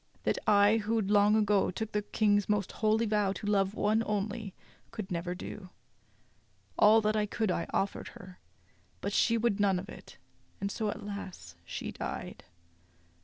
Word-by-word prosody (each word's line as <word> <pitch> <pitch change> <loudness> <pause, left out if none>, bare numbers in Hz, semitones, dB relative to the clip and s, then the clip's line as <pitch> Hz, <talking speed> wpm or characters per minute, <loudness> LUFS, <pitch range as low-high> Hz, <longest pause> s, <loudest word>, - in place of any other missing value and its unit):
That - - 0
I, 205 +1 +5
who 225 +1 0
long 205 +1 +4
ago 210 -2 +3
took 220 +4 -4
the 210 - 0
King's 205 -1 +1
most 205 -2 0
holy 220 +1 +1
vow 210 -2 +1
to 205 - -8
love 200 -1 +1
one 215 +1 +2
only, 210 0 -3 0.3
could 215 -5 -7
never 175 +1 -2
do. 190 +1 -8 1.1
All 220 +1 +6
that 215 0 +1
I 210 -1 +1
could 215 -1 -1
I 170 - -2
offered 195 - -2
her; 185 -1 -13 0.6
but 200 - -3
she 230 +3 +3
would 225 -3 +1
none 195 -2 +3
of 195 +3 -6
it, - - -12 0.4
and 200 0 -2
so, 215 -1 -1
alas! 195 - -7
she - - -5
died." - - -6
205 Hz, 165 wpm, -30 LUFS, 195-215 Hz, 1.1 s, All